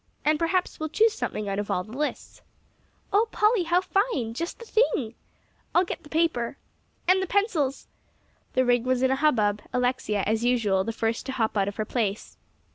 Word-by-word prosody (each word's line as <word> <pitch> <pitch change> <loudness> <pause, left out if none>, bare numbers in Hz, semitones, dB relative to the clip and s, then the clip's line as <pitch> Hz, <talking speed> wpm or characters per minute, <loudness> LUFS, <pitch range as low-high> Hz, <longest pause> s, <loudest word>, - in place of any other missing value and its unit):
And 305 0 +3
perhaps 360 +2 0
we'll 315 0 -3
choose 435 +7 +3
something 210 - -3
out 195 0 -1
of 205 - -4
all 180 - 0
the 215 - -14
lists." 300 +2 -4 0.7
"Oh, 430 +3 +4
Polly, 425 -3 +3
how 345 +2 +3
fine! 375 - 0
just 335 +8 -4
the 465 - -11
thing." 430 - +1 0.6
"I'll 360 - +5
get - - -5
the 295 - -15
paper." 310 -7 0 0.5
"And 375 +1 +5
the 380 - -2
pencils." 340 - 0 0.7
The 255 0 +2
ring 245 -1 +3
was 255 0 +1
in 260 - +3
a - - +3
hubbub; 215 -9 +2
Alexia, 245 -5 0
as 220 +2 0
usual, 220 -6 +2
the 230 - -2
first 225 +2 -2
to 265 - -3
hop 225 -4 0
out 195 -1 +2
of 200 - -4
her 215 - -2
place. 215 -3 -2
255 Hz, 195 wpm, -26 LUFS, 220-345 Hz, 0.7 s, I'll